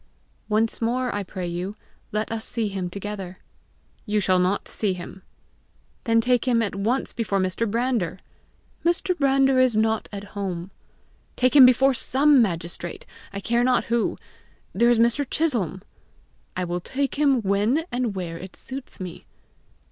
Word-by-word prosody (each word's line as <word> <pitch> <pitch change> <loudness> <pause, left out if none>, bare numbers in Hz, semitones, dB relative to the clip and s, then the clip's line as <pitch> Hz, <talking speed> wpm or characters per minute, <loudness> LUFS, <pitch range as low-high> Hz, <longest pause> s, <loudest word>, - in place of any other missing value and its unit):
"Once 220 +2 +1
more 245 +2 0
I 205 - -1
pray 185 -1 -5
you, 180 +4 -4 0.4
let 215 +1 -2
us 225 -1 -3
see 225 -3 -2
him 190 -2 -3
together." 195 -1 -6 0.7
"You 210 0 +1
shall 185 -2 +3
not 185 +3 0
see 205 -3 0
him." 180 +1 -9 0.8
"Then 230 -1 +4
take 245 +1 +1
him 235 -2 +3
at 205 - -2
once 220 +7 -1
before 200 -4 -1
Mr. 190 +4 0
Brander." 230 -6 0 0.7
"Mr. 345 +2 +1
Brander 270 -3 +3
is 255 -4 +3
not 220 0 +1
at 200 -1 -6
home." 190 -3 -4 0.6
"Take 255 +3 +2
him 265 -3 +10
before 265 +2 +4
SOME 265 +3 +4
magistrate 175 -3 -3 0.3
I 200 - -5
care 235 +3 +1
not 250 -2 +1
who. 235 - +1 0.6
There 235 +4 +4
is 240 - +4
Mr. 235 +5 +3
Chisholm!" 210 - 0 0.7
"I 185 - 0
will 175 0 -2
take 275 +7 -2
him 275 -5 +3
when 205 +10 +2
and 245 -4 -1
where 170 -3 -4
it 185 0 -10
suits 265 0 -8
me." 180 -3 -8
220 Hz, 155 wpm, -24 LUFS, 190-250 Hz, 0.8 s, him